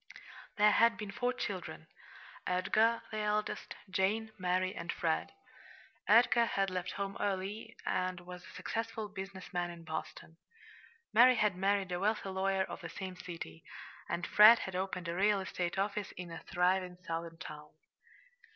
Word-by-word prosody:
There 210 0 +6
had 230 +2 +4
been 210 -2 -5
four 245 +5 0
children: 250 - -5 0.6
Edgar, 215 +5 +2
the 215 - -3
eldest; 210 0 -1
Jane, 200 +4 0
Mary, 185 -1 0
and 170 0 -4
Fred. 160 -2 -1 0.8
Edgar 235 +1 +6
had 195 -3 0
left 180 -1 -3
home 200 0 -3
early, 205 +3 -3
and 185 -1 -1
was 180 0 -10
a - - -13
successful 225 -1 -4
business 195 -1 -8
man 175 -1 0
in 170 -1 -9
Boston. 160 0 -6 0.8
Mary 250 +3 +8
had 210 -4 +2
married 195 0 +1
a 175 - -1
wealthy 210 0 0
lawyer 190 0 +1
of - - -7
the - - -6
same 190 -2 -6
city; 165 - -8 0.5
and 175 - -1
Fred 215 +3 +9
had 190 -4 -5
opened 185 -1 -3
a 170 - -2
real 200 +3 +3
estate 180 -1 -3
office 200 0 -1
in 180 -2 -7
a 165 - -6
thriving 180 0 +1
Southern 165 0 -4
town. 150 -1 -9
190 Hz, 155 wpm, -33 LUFS, 180-210 Hz, 0.8 s, Fred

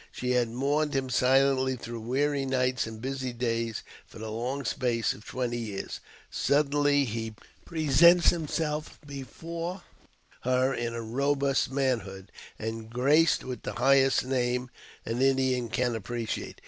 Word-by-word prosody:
She 125 0 -2
has 125 -1 +2
mourned 140 +5 0
him 130 -1 -1
silently 130 +1 +3
through 115 -1 -7
weary 135 +5 0
nights 130 -2 0
and 110 -1 -8
busy 130 +1 -3
days 115 -2 -2 0.2
for - - -13
the 110 0 -6
long 125 +5 -3
space 120 -4 0
of 105 - -13
twenty 120 -2 -2
years; 105 -4 -5 0.3
suddenly 145 0 +2
he 115 -1 -4 0.3
presents 170 +2 +5
himself 155 -2 -3
before 165 +6 -6 0.6
her 130 +1 +2
in 120 -1 -3 0.2
robust 140 0 +1
manhood, 115 -8 -2 0.3
and 110 0 -5
graced 145 +7 +3
with 130 -1 -6
the - - -5
highest 135 +1 +4
name 125 -1 -1 0.3
an 115 +3 -2
Indian 130 -3 +2
can 120 0 0
appreciate. 115 +1 -4
130 Hz, 135 wpm, -28 LUFS, 120-140 Hz, 0.6 s, presents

